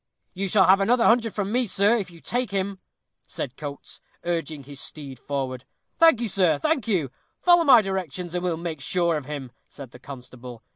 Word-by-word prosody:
"You 195 Hz, +1 st, -3 dB
shall 190 Hz, 0 st, +4 dB
have 190 Hz, +3 st, +5 dB
another 235 Hz, +4 st, +3 dB
hundred 230 Hz, -1 st, +3 dB
from 200 Hz, -1 st, -2 dB
me, 250 Hz, +2 st, +1 dB
sir, 200 Hz, +3 st, +3 dB
if 200 Hz, -6 st, -3 dB
you 170 Hz, -2 st, -16 dB
take 245 Hz, 0 st, -1 dB
him," 195 Hz, 0 st, -3 dB, 0.5 s
said 130 Hz, -, -5 dB
Coates, 145 Hz, -2 st, -8 dB, 0.2 s
urging 160 Hz, -4 st, -3 dB
his 140 Hz, 0 st, -8 dB
steed 140 Hz, -5 st, -7 dB
forward. 130 Hz, -3 st, -4 dB, 0.4 s
"Thank 325 Hz, -7 st, +6 dB
you, 235 Hz, -, -1 dB
sir, 180 Hz, -6 st, +2 dB
thank 275 Hz, -, -1 dB
you. 170 Hz, -, 0 dB, 0.3 s
Follow 350 Hz, -1 st, +5 dB
my 255 Hz, -7 st, +7 dB
directions, 180 Hz, -3 st, -4 dB
and 180 Hz, 0 st, -2 dB
we'll 175 Hz, -3 st, -1 dB
make 165 Hz, -3 st, -5 dB
sure 170 Hz, +4 st, +1 dB
of 150 Hz, -3 st, -4 dB
him," 140 Hz, -4 st, -6 dB, 0.2 s
said 135 Hz, -4 st, -11 dB
the 125 Hz, -, -14 dB
constable. 125 Hz, -3 st, -11 dB
175 Hz, 195 wpm, -24 LUFS, 140-205 Hz, 0.5 s, my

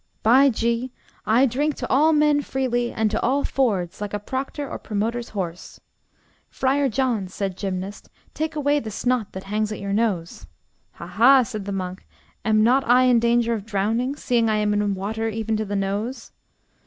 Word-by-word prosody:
By 260 Hz, +5 st, +6 dB
G, 235 Hz, +1 st, -1 dB, 0.4 s
I 235 Hz, +5 st, +5 dB
drink 280 Hz, +4 st, 0 dB
to 250 Hz, -, -5 dB
all 305 Hz, +4 st, +4 dB
men 300 Hz, -1 st, +3 dB
freely, 245 Hz, -3 st, -1 dB
and 220 Hz, -1 st, -1 dB
at 220 Hz, -, -1 dB
all 275 Hz, +4 st, +1 dB
fords, 200 Hz, -9 st, -1 dB
like 205 Hz, 0 st, -3 dB
a -, -, -2 dB
proctor 270 Hz, +6 st, -4 dB
or -, -, -6 dB
promoter's 230 Hz, +3 st, -3 dB
horse. 180 Hz, -4 st, -6 dB, 0.7 s
Friar 270 Hz, +1 st, +1 dB
John, 235 Hz, -5 st, 0 dB
said 190 Hz, 0 st, -4 dB
Gymnast, 190 Hz, +1 st, -5 dB, 0.2 s
take 315 Hz, 0 st, -3 dB
away 290 Hz, 0 st, +2 dB
the 225 Hz, -, -6 dB
snot 235 Hz, 0 st, -1 dB
that 190 Hz, -, -7 dB
hangs 215 Hz, +2 st, -2 dB
at 210 Hz, -, -5 dB
your 200 Hz, 0 st, -3 dB
nose. 200 Hz, -6 st, -1 dB, 0.5 s
Ha, -, -, -9 dB
ha, 260 Hz, +3 st, +5 dB
said 215 Hz, -4 st, -6 dB
the 200 Hz, -, -4 dB
monk, 185 Hz, -1 st, -5 dB, 0.4 s
am 215 Hz, 0 st, +3 dB
not 255 Hz, +4 st, +4 dB
I 250 Hz, +1 st, +6 dB
in 250 Hz, -2 st, +4 dB
danger 235 Hz, 0 st, +2 dB
of 215 Hz, -3 st, -3 dB
drowning, 225 Hz, +6 st, -1 dB
seeing 235 Hz, -5 st, +1 dB
I 215 Hz, -, +2 dB
am 210 Hz, -1 st, +1 dB
in 205 Hz, -1 st, 0 dB
water 220 Hz, +4 st, -3 dB
even 220 Hz, 0 st, -2 dB
to 215 Hz, -, -2 dB
the 205 Hz, 0 st, -4 dB
nose? 200 Hz, +6 st, -3 dB
225 Hz, 185 wpm, -23 LUFS, 205-260 Hz, 0.7 s, By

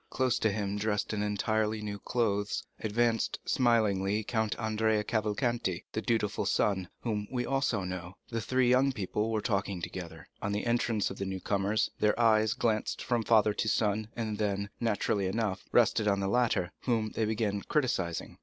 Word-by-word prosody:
Close 130 Hz, -2 st, +1 dB
to 110 Hz, -, +2 dB
him, 100 Hz, 0 st, -2 dB
dressed 105 Hz, 0 st, -1 dB
in 105 Hz, -, -1 dB
entirely 105 Hz, +1 st, 0 dB
new 105 Hz, -1 st, -5 dB
clothes, 105 Hz, -4 st, -1 dB, 0.2 s
advanced 115 Hz, +1 st, +1 dB
smilingly 110 Hz, -4 st, +2 dB
Count 110 Hz, -1 st, -1 dB
Andrea 110 Hz, -1 st, +1 dB
Cavalcanti, 110 Hz, -3 st, -1 dB
the 110 Hz, -, -1 dB
dutiful 110 Hz, -3 st, 0 dB
son, 95 Hz, -3 st, +1 dB
whom 105 Hz, -3 st, -2 dB
we 125 Hz, -1 st, -1 dB
also 135 Hz, -7 st, 0 dB
know. 90 Hz, 0 st, -6 dB
The 115 Hz, -1 st, -2 dB
three 130 Hz, +3 st, +2 dB
young 130 Hz, +2 st, +4 dB
people 105 Hz, +1 st, -2 dB
were 110 Hz, -1 st, 0 dB
talking 100 Hz, -3 st, -1 dB
together. 85 Hz, 0 st, -7 dB
On 100 Hz, -, -1 dB
the 105 Hz, -, -2 dB
entrance 120 Hz, -3 st, +1 dB
of -, -, -8 dB
the 100 Hz, -, -2 dB
new 95 Hz, 0 st, -3 dB
comers, 100 Hz, +2 st, 0 dB
their 105 Hz, +2 st, +2 dB
eyes 110 Hz, -1 st, +4 dB
glanced 110 Hz, -2 st, -1 dB
from 120 Hz, -2 st, +1 dB
father 110 Hz, -2 st, +4 dB
to 110 Hz, -, -1 dB
son, 105 Hz, 0 st, +1 dB
and 110 Hz, -3 st, -3 dB
then, 100 Hz, -1 st, -1 dB
naturally 105 Hz, -3 st, 0 dB
enough, 95 Hz, -2 st, -2 dB
rested 110 Hz, -2 st, +3 dB
on 100 Hz, -1 st, +2 dB
the 100 Hz, -, -1 dB
latter, 105 Hz, -5 st, +1 dB
whom 110 Hz, -4 st, +1 dB
they 110 Hz, -, 0 dB
began 105 Hz, -2 st, -1 dB
criticising. 95 Hz, -, -1 dB
105 Hz, 175 wpm, -30 LUFS, 100-115 Hz, 0.2 s, young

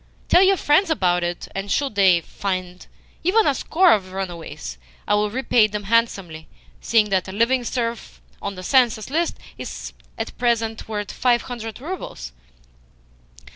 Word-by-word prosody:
Tell 355 Hz, -, +6 dB
your 390 Hz, 0 st, +5 dB
friends 315 Hz, +6 st, +3 dB
about 180 Hz, -, +2 dB
it, 175 Hz, 0 st, -3 dB
and, 195 Hz, +1 st, -4 dB
should 280 Hz, -5 st, 0 dB
they 190 Hz, -4 st, +4 dB
find 185 Hz, -1 st, -5 dB, 0.4 s
even 415 Hz, +6 st, +4 dB
a 285 Hz, -, +3 dB
score 345 Hz, +6 st, +3 dB
of 195 Hz, -3 st, +3 dB
the 185 Hz, -, -13 dB
runaways, 170 Hz, -, -6 dB, 0.3 s
it -, -, +2 dB
will 210 Hz, 0 st, +2 dB
repay 235 Hz, -1 st, +3 dB
them 210 Hz, 0 st, -5 dB
handsomely, 195 Hz, -7 st, 0 dB, 0.3 s
seeing 215 Hz, -2 st, +2 dB
that 190 Hz, -1 st, +1 dB
a -, -, -6 dB
living 235 Hz, +5 st, +2 dB
serf 235 Hz, -1 st, -3 dB, 0.2 s
on 200 Hz, -1 st, -4 dB
the 185 Hz, -, -8 dB
census 240 Hz, 0 st, +2 dB
list 335 Hz, +3 st, 0 dB, 0.2 s
is -, -, -7 dB, 0.2 s
at -, -, -5 dB
present 230 Hz, -2 st, 0 dB
worth 210 Hz, -2 st, -4 dB
five 245 Hz, -2 st, +2 dB
hundred 230 Hz, -3 st, -7 dB
roubles." 265 Hz, -, -6 dB
220 Hz, 160 wpm, -22 LUFS, 190-255 Hz, 0.4 s, Tell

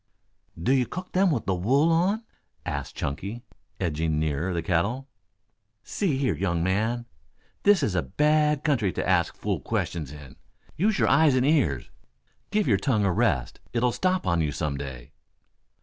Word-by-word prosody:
"Do 85 Hz, -, +1 dB
you 130 Hz, -2 st, +3 dB
cook 185 Hz, +1 st, -7 dB
them 190 Hz, +1 st, +3 dB
with 135 Hz, -9 st, -1 dB
the 95 Hz, -, +1 dB
wool 135 Hz, -, +2 dB
on?" 190 Hz, +7 st, +2 dB, 0.4 s
asked -, -, -4 dB
Chunky, 100 Hz, -, -4 dB, 0.4 s
edging 80 Hz, -3 st, -1 dB
nearer 80 Hz, +4 st, -1 dB
the 85 Hz, -2 st, -2 dB
kettle. 100 Hz, +11 st, 0 dB, 0.8 s
"See 175 Hz, -10 st, -1 dB
here, 130 Hz, -, +1 dB
young 85 Hz, 0 st, -1 dB
man. 110 Hz, +6 st, 0 dB, 0.6 s
This 200 Hz, -4 st, +5 dB
here -, -, +2 dB
is 105 Hz, -, -1 dB
a 90 Hz, -, +1 dB
bad 150 Hz, -, +2 dB
country 120 Hz, -, +1 dB
to -, -, -2 dB
ask 90 Hz, -2 st, +2 dB
fool -, -, -2 dB
questions 75 Hz, -5 st, -3 dB
in. 75 Hz, -3 st, -12 dB, 0.4 s
Use 205 Hz, +4 st, +1 dB
your -, -, +2 dB
eyes 155 Hz, -4 st, +5 dB
and 130 Hz, 0 st, +2 dB
ears. 135 Hz, -, +1 dB, 0.6 s
Give 210 Hz, -4 st, +1 dB
your 105 Hz, -6 st, +4 dB
tongue 110 Hz, -4 st, +1 dB
a 100 Hz, -, +2 dB
rest. 85 Hz, -, 0 dB
It'll 120 Hz, +1 st, +2 dB
stop 185 Hz, +6 st, 0 dB
on 85 Hz, -1 st, +2 dB
you 75 Hz, -2 st, 0 dB
some 70 Hz, 0 st, -2 dB
day." 65 Hz, -3 st, -7 dB
110 Hz, 170 wpm, -26 LUFS, -, 0.8 s, This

